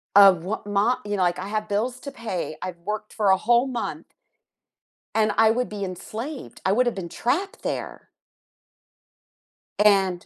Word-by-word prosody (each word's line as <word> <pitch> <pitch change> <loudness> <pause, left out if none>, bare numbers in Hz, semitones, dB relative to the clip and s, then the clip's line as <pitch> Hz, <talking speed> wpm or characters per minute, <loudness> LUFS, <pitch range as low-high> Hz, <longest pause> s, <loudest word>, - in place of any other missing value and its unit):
Of 195 -4 +8
wha 200 +5 -2
mo 205 +5 +2
you 205 0 -2
know, 185 - +1
like, 175 0 +1
I 190 - -5
have 215 0 -3
bills 240 +5 -1
to 280 - -7
pay. 185 -8 -4
I've 180 -2 -5
worked 210 +4 -5
for 210 -2 +1
a 190 - +6
whole 240 +4 +3
month 255 -3 -5 1.0
and 215 -1 +3
I 220 0 +6
would 250 +2 0
be 205 -1 -5
enslaved. 220 - -6
I 190 - +3
woulda 240 +4 +3
been 185 -5 -6
trapped 365 +11 -2
there. - - -4 1.7
And 195 -4 +3
210 Hz, 165 wpm, -24 LUFS, 190-235 Hz, 1.7 s, Of